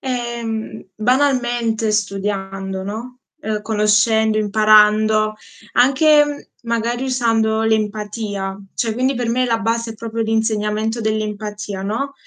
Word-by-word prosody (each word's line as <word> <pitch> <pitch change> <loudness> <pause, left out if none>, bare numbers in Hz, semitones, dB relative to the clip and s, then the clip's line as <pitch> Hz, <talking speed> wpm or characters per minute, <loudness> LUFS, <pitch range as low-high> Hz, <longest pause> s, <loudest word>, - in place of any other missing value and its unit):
Ehm, 235 -4 -4
banalmente 240 -2 +1
studiando, 195 -2 -2
no, 230 +6 -7 0.2
ehm, 215 -1 -3
conoscendo, 215 +1 +2
imparando, 215 0 +4 0.4
anche, 295 +5 +5
mhmm, 290 -1 -6 0.2
magari 235 +2 -1
usando 225 -3 +1
l'empatia, 210 -2 -2 0.2
cioè 230 -2 -1
quindi 255 +4 0
per 240 -1 -2
me 255 +2 +1
la 230 -1 +1
base 230 0 -1
è - - -14
proprio 230 0 -4
l'insegnamento 220 0 -1
dell'empatia, 210 -2 -3
no, 245 +8 -3
220 Hz, 115 wpm, -19 LUFS, 210-235 Hz, 0.4 s, anche